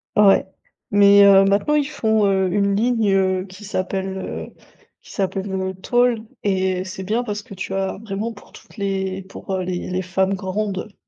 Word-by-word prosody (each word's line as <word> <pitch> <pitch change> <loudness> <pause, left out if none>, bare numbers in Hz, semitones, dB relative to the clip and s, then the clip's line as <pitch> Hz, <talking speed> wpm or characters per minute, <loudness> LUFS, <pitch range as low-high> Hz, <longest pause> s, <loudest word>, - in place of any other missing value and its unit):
Ouais. 205 -2 +5 0.5
Mais 200 0 +7
heu, 195 -1 +7
maintenant, 200 +9 +2
ils 295 -1 +1
font, 220 -7 +1
heu, 190 -1 +2
une 200 +1 +1
ligne, 225 -1 +1
heu, 190 -1 +1
qui 190 +2 -13
s'appelle, 190 0 -3
heu, - - -6 0.5
qui - - -16
s'appelle, 195 0 -2
heu: 190 0 -2
«Tall». 245 0 +2 0.2
Et 190 -2 0
c'est 190 0 -7
bien 220 +6 0
parce 210 -3 -4
que 200 - -12
tu 190 +1 -5
as 195 0 -2
vraiment 215 +2 -4
pour 205 - -17
toutes - - -17
les 195 -1 -2
pour, 195 +1 -9
heu, 185 -1 -1
les 180 -1 -4
les 180 0 -1
femmes 190 +1 0
grandes. 195 +1 -3
195 Hz, 185 wpm, -21 LUFS, 190-210 Hz, 0.5 s, Mais